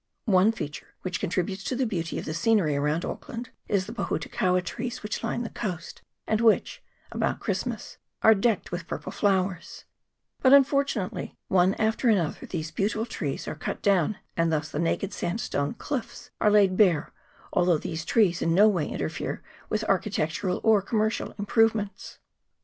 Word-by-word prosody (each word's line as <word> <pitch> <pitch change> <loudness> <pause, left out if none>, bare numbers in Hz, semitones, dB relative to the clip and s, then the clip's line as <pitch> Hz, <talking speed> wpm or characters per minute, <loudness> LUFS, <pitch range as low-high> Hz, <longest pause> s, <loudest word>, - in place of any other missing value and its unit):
One 200 -1 +5
feature 150 -10 -7
which 180 -2 -2
contributes 190 0 -2
to 255 - -1
the 260 +1 +1
beauty 170 -7 -3
of - - -4
the 155 - -3
scenery 170 -3 +2
around 150 +4 0
Auckland 235 0 -6 0.2
is 195 -2 +1
the - - -7
pohutukaua 180 +3 0
trees 240 +5 -5
which 210 +2 -4
line 235 +1 -1
the 230 - -6
coast, 180 -6 -5 0.2
and 220 0 +1
which, 225 -2 +3 0.3
about - - -1
Christ - - -2
mas, - - -6 0.3
are 220 - +8
decked 215 0 0
with 175 +1 -4
purple - - -5
flowers; 190 -2 -1 0.6
but, 260 0 +6
unfortu 280 -3 +4
nately, 185 - -6
one 185 +1 +4
after 220 +3 +1
another 180 -8 0
these 155 -3 -4
beautiful 210 +6 -1
trees 150 - -4
are - - -2
cut 155 - -5
down, 195 -1 +2 0.2
and 165 -1 +2
thus 155 -1 -1
the 145 - -4
naked 175 +4 -1
sandstone 170 -6 -2
cliffs 245 -3 -5
are 210 - +5
laid 200 -3 +5
bare, 180 -7 +3 0.4
although 175 -2 +3
these 160 +1 -4
trees 190 -5 +2
in 165 0 +2
no 205 +3 +7
way 175 -8 +1
interfere - - -4 0.3
with 215 0 0
architectural 185 -2 0
or 220 -2 +5
commercial 215 +2 -1
improvements. 215 0 0
195 Hz, 165 wpm, -27 LUFS, 170-220 Hz, 0.6 s, are